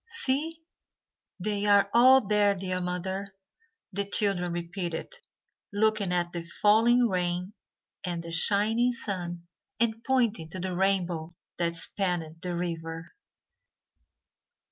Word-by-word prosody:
"See, 325 - -1 0.8
they 205 +2 -1
are 200 -1 +5
all 255 +1 +7
there, 205 0 +3
dear 185 -1 -3
mother," 190 +2 -4 0.6
the 200 - 0
children 195 -3 +1
repeated, 175 - -4 0.6
looking 210 -2 +1
at 175 -1 0
the 170 -1 -4
falling 225 +7 +3
rain 180 0 -2 0.5
and 175 -3 -3
the 170 - -8
shining 220 +7 +2
sun, 175 -6 -5 0.3
and 225 0 0
pointing 230 -11 +1
to 185 - -7
the 185 0 -3
rainbow 175 -3 0 0.2
that 170 -1 0
spanned 165 -2 0
the 180 -1 -3
river. 165 -1 -5
190 Hz, 115 wpm, -28 LUFS, 175-215 Hz, 0.8 s, all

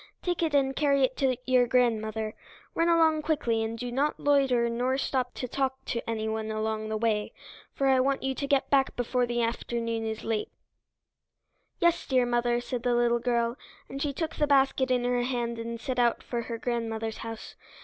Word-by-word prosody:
Take 355 -2 -1
it 320 -3 +1
and 270 -1 +2
carry 280 -2 +3
it 260 0 +1
to 260 -3 +1
your 255 -1 +4
grandmother. 220 -3 +1 0.4
Run 335 +1 +2
along 320 -2 +4
quickly, 290 -8 0
and 225 +1 -3
do 245 +1 -4
not 280 +4 0
loiter 270 -5 +3
nor 250 +3 0
stop 255 -2 -1
to 250 - -4
talk 265 +1 -2
to 235 -1 -3
anyone 220 -1 -2
along 215 0 -2
the 215 - -1
way, 215 -2 0 0.4
for 275 - 0
I 265 -1 +4
want 270 +1 +1
you 265 0 0
to 280 +1 -4
get 275 -1 +1
back 270 -1 +3
before 245 0 0
the 240 0 0
afternoon 230 0 -2
is 220 0 -4
late." 225 -2 -1 1.3
"Yes, 345 0 +2
dear 255 -3 +3
mother," 240 0 +1
said 245 0 -4
the 245 0 +1
little 240 0 +3
girl, 235 0 0 0.3
and 275 - -6
she 290 - 0
took 315 +3 -4
the 295 - +2
basket 270 -1 +3
in 250 -1 +2
her 245 0 +1
hand 240 -2 -2
and 230 0 -5
set 255 +1 -3
out 240 -1 +2
for 240 -1 -3
her 230 - -3
grandmother's 225 -2 -3
house. 225 -1 -7
245 Hz, 195 wpm, -28 LUFS, 230-270 Hz, 1.3 s, your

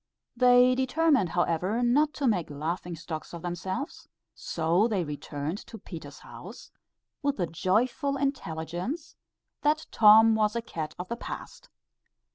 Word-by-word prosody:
They 250 +1 +6
determined 265 - +2
however 180 +7 0
not 290 +5 +3
to 280 - 0
make 180 -9 +1
laughing 165 +4 -4
stocks 160 0 -7
of 170 - -9
themselves, 185 - -5 0.2
so 170 +6 +1
they 205 -6 0
returned 150 +3 -5
to 225 - -9
Peter's 155 -9 -10
house - - -11 0.5
with 285 0 0
the 175 - 0
joyful 235 - 0
intelligence, 185 - -3 0.5
that 305 +2 +1
Tom 220 +1 +7
was 215 0 +1
a 235 - 0
cat 160 -8 -5
of 180 - -6
the 235 - -4
past. - - -8
210 Hz, 135 wpm, -28 LUFS, 170-255 Hz, 0.5 s, Tom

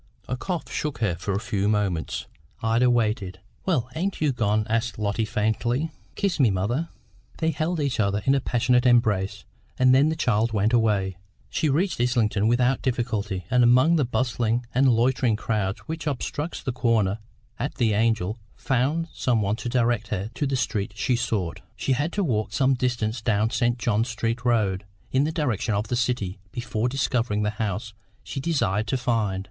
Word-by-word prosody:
A 125 - -1
cough 175 +6 -4
shook 150 -2 -2
her 105 -6 0
for 90 +4 -3
a 100 - 0
few 105 -2 -1
moments. 100 -6 -1 0.4
Ida 115 +3 +3
waited. 105 -6 0 0.3
"Well, 130 -10 +1
ain't 190 +4 -2
you 150 -2 +2
gone?" 110 -3 +1
asked 115 +1 -1
Lotty 105 +1 0
faintly. 120 +8 0 0.2
"Kiss 195 -5 0
me, 130 -5 +5
mother." 115 - -1 0.5
They 160 0 +1
held 160 +3 -1
each 140 -5 -1
other 100 -1 +1
in 135 - +4
a 140 - +2
passionate 125 +1 +2
embrace, 100 -5 +2 0.3
and 130 0 +5
then 140 +4 +5
the 160 - -1
child 115 -6 +1
went 105 +2 +1
away. 100 -5 +2 0.3
She 155 - +1
reached 165 0 +1
Islington 110 -4 +2
without 125 +3 +2
difficulty, 110 -7 -2
and 125 -1 +5
among 130 +8 +5
the 155 - +3
bustling 120 -1 0
and 135 +2 +4
loitering 120 0 +2
crowd 105 -3 -1
which 160 0 -5
obstructs 145 +3 -3
the 130 - -1
corner 110 -5 +1 0.4
at 140 - -3
the 115 -4 +2
Angel, 110 -1 +1 0.2
found 140 +6 0
some 115 -4 +1
one 100 +2 0
to 120 - -4
direct 120 -2 +1
her 105 +1 -3
to 145 +3 -1
the 135 - 0
street 100 -5 -1
she 125 +2 +1
sought. 110 -8 -2
She - - -2
had 145 +6 +1
to 200 - 0
walk 110 - -1
some 135 +2 +3
distance 120 -3 -1
down 110 0 +1
St. 120 -1 +1
John 115 -2 +1
Street 115 0 -2
Road, 105 -6 +1 0.3
in 135 +2 +3
the 155 - -1
direction 125 - -1
of 105 +2 -2
the 125 - 0
City, 120 -6 -1
before 120 0 -2
discovering 120 -5 0
the 105 - +1
house 105 0 -3 0.3
she 135 - -5
desired 115 - 0
to 130 - 0
find. 115 -6 0
120 Hz, 180 wpm, -25 LUFS, 105-130 Hz, 0.5 s, me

